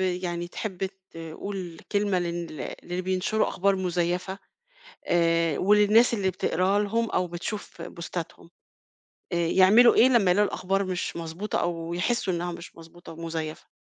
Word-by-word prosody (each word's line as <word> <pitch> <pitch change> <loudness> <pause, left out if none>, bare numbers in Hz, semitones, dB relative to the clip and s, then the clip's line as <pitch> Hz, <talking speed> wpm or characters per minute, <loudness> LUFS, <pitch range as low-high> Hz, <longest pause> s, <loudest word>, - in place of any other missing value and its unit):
يعني 180 -2 -2
تحب 190 0 -4 0.2
تقول 165 +2 -7
كلمة 200 -2 +2
لل 170 -5 -4
للي 180 +1 -4
بينشروا 190 +4 0
أخبار 195 +1 +1
مُزيفة 180 +1 -1 0.7
آآ، 165 -2 +2
وللناس 210 +4 +5
اللي 200 -4 +1
بتقراها 185 +2 +1
لهم 225 +2 0
أو 180 - +1
بتشوف 175 +5 -6
بوستَاتْهم، 170 -1 -7 0.8
آآ، - - -1
يعملوا 190 +7 +6
إيه 245 - +7
لمّا 225 -8 +4
يلاقوا 205 +3 +3
الأخبار 195 +2 -1
مش 185 -1 -3
مضبوطة 170 +5 -3
أو 170 -1 -3
يحسوا 185 +2 0
إنها 175 +1 -2
مش 170 0 -10
مضبوطة 165 +1 -13
ومزيفة؟ 160 -1 -5
180 Hz, 135 wpm, -26 LUFS, 170-200 Hz, 0.8 s, إيه